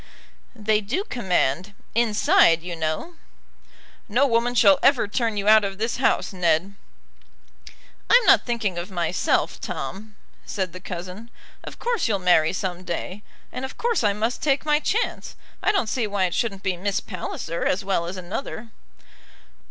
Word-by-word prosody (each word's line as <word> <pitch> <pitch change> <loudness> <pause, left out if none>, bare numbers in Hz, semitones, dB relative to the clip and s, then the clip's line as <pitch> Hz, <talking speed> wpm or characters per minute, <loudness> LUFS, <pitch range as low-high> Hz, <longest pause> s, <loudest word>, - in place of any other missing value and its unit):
"They 215 -1 +1
do 245 - -2
command, 190 - -1 0.2
inside, 210 -7 +4
you 175 -1 -5
know." 160 - -3 0.9
"No 245 +7 +3
woman 240 -1 +1
shall 275 +4 +6
ever 265 -6 +4
turn 225 0 -1
you 200 0 -2
out 215 0 +7
of 195 -1 -3
this 225 +3 -2
house, 260 - +1
Ned." 180 +1 +1 1.4
"I'm 485 -1 +6
not - - +6
thinking 220 -7 -2
of 175 +3 -6
myself, 175 -2 0
Tom," 210 +2 -6 0.3
said 190 -4 -3
the 185 - -8
cousin. 185 +5 -7 0.3
"Of - - -9
course 475 - -1
you'll 210 -3 +1
marry 175 -4 +3
some 185 -1 -4
day, 185 +3 -5 0.3
and 255 - -6
of 265 - -6
course 470 - 0
I 205 - +3
must 225 +4 -2
take 280 -1 +1
my 300 -1 +3
chance. 430 +9 -2 0.3
I - - +3
don't 390 - +1
see 230 0 -1
why 200 -2 0
it 175 - -2
shouldn't 200 -5 -2
be 185 -2 -1
Miss 195 +2 -1
Palliser 170 -3 -5
as 195 +2 0
well 180 -4 0
as 185 +2 -6
another." 215 +5 -6
205 Hz, 160 wpm, -23 LUFS, 180-240 Hz, 1.4 s, out